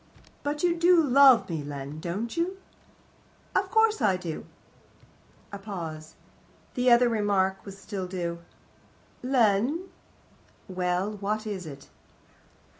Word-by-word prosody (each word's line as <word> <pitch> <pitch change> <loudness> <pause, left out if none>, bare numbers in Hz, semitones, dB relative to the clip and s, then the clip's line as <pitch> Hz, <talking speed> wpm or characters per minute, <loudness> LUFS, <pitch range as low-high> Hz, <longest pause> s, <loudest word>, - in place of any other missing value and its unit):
"But 295 +2 -3
you 345 -1 +3
do 345 +1 +5
love 275 -4 +6
me, 160 -4 -4
Len, 145 +1 -7
don't 195 - -4
you?" 350 +3 -1 1.0
"Of - - +1
course 445 - +3
I 195 -4 +3
do." 170 -4 -6 1.0
A 200 - -7
pause. 165 -6 -7 0.6
The 250 -1 +2
other 240 +1 +6
remark 200 -4 +1
was 195 -1 -10
still 195 -2 -5
due. 170 -2 -4 0.8
"Len 255 - +1 0.4
" - - -32
"Well? 185 +3 -1
What 215 +2 -2
is 195 -5 -5
it?" 140 -2 -10
205 Hz, 120 wpm, -27 LUFS, 180-255 Hz, 1.0 s, love